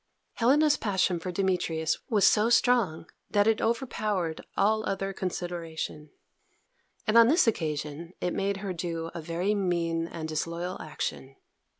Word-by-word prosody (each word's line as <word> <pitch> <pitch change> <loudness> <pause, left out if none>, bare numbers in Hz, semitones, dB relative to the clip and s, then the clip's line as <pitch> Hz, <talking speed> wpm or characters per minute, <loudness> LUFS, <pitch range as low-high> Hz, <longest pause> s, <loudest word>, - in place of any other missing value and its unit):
Helena's 290 +5 +4
passion 190 -4 +1
for 180 +2 -4
Demetrius 170 -4 0
was 210 -5 +4
so 215 +3 +4
strong 235 -10 +3 0.2
that 205 -1 +3
it 220 0 +2
overpowered 215 -8 -1
all 215 +1 +3
other 195 -1 -2
consideration, 170 -4 -4 1.0
and 225 +1 +5
on 230 - +8
this 325 +7 +4
occasion 155 -5 -2
it 180 - -1
made 200 0 -1
her 190 - -2
do 165 -1 -4
a 170 - -5
very 170 +5 -1
mean 170 -4 0
and 160 -2 -6
disloyal 170 +3 -3
action. 135 -3 -5
180 Hz, 135 wpm, -28 LUFS, 165-215 Hz, 1.0 s, on